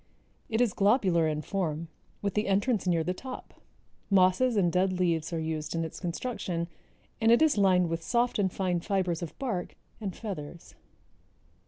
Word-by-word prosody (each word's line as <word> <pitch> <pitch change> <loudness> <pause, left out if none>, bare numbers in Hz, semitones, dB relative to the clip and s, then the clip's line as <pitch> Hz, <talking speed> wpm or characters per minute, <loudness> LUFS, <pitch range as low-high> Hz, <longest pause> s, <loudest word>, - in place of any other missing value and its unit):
It 220 +1 +1
is 235 -6 +2
globular 195 -6 +3
in 155 0 -2
form 170 -4 -2 0.4
with 200 -2 0
the 210 +1 0
entrance 200 +1 +1
near 170 -2 +2
the 180 +3 -1
top. 255 +7 -9 0.5
Mosses 195 +5 +4
and 175 -4 +3
dead 185 +2 +2
leaves 170 -3 0
are 165 - -1
used 160 0 -3
in 165 0 0
its 160 - -7
construction 175 -2 -3 0.5
and 225 +1 +5
it 235 - +6
is 315 -2 +4
lined 185 -3 +4
with 165 0 -2
soft 240 +5 +1
and 190 -2 +2
fine 180 -2 0
fibers 185 -2 -1
of 170 - -6
bark 230 -10 -3 0.2
and 200 -5 -4
feathers. 170 -6 -7
185 Hz, 170 wpm, -29 LUFS, 170-210 Hz, 0.5 s, it